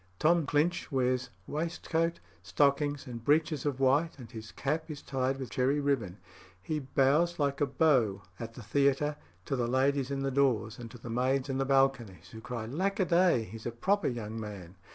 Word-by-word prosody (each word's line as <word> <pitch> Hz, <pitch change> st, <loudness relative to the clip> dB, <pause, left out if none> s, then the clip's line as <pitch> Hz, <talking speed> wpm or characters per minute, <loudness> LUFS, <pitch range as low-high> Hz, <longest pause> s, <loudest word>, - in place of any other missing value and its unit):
Tom 165 Hz, -, +3 dB
Clinch 160 Hz, +3 st, +1 dB
wears 130 Hz, -1 st, +1 dB, 0.2 s
waistcoat, 165 Hz, +1 st, -1 dB, 0.2 s
stockings, 140 Hz, -, +1 dB
and 120 Hz, -3 st, -7 dB
breeches 150 Hz, 0 st, +2 dB
of 135 Hz, -2 st, -2 dB
white, 145 Hz, +5 st, +2 dB
and 120 Hz, -4 st, -11 dB
his 110 Hz, -2 st, -8 dB
cap 155 Hz, +4 st, -2 dB
is 150 Hz, -2 st, -6 dB
tied 135 Hz, 0 st, -1 dB
with 130 Hz, -5 st, -6 dB
cherry 130 Hz, +5 st, +1 dB
ribbon. 130 Hz, -10 st, -1 dB, 0.4 s
He 150 Hz, -, -3 dB
bows 140 Hz, +5 st, +2 dB
like 140 Hz, -1 st, 0 dB
a 145 Hz, -, +3 dB
beau 125 Hz, -9 st, +2 dB, 0.2 s
at 115 Hz, 0 st, -7 dB
the 120 Hz, -, -9 dB
theatre 140 Hz, +5 st, +2 dB, 0.3 s
to -, -, -1 dB
the 120 Hz, -2 st, 0 dB
ladies 135 Hz, +2 st, +1 dB
in 135 Hz, -1 st, -2 dB
the 135 Hz, -, 0 dB
doors 125 Hz, -5 st, +1 dB
and 120 Hz, -1 st, -7 dB
to 120 Hz, -, -11 dB
the 115 Hz, 0 st, -8 dB
maids 130 Hz, +3 st, +1 dB
in 135 Hz, 0 st, -1 dB
the 135 Hz, -, +1 dB
balconies, 130 Hz, -, +1 dB
who 110 Hz, -, -9 dB
cry, 115 Hz, -1 st, -5 dB
"Lackaday, 180 Hz, -, +2 dB
he's 110 Hz, +3 st, -8 dB
a -, -, -2 dB
proper 195 Hz, -, +1 dB
young 115 Hz, -2 st, -4 dB
man." 100 Hz, -4 st, -8 dB
135 Hz, 185 wpm, -30 LUFS, 120-150 Hz, 0.4 s, Tom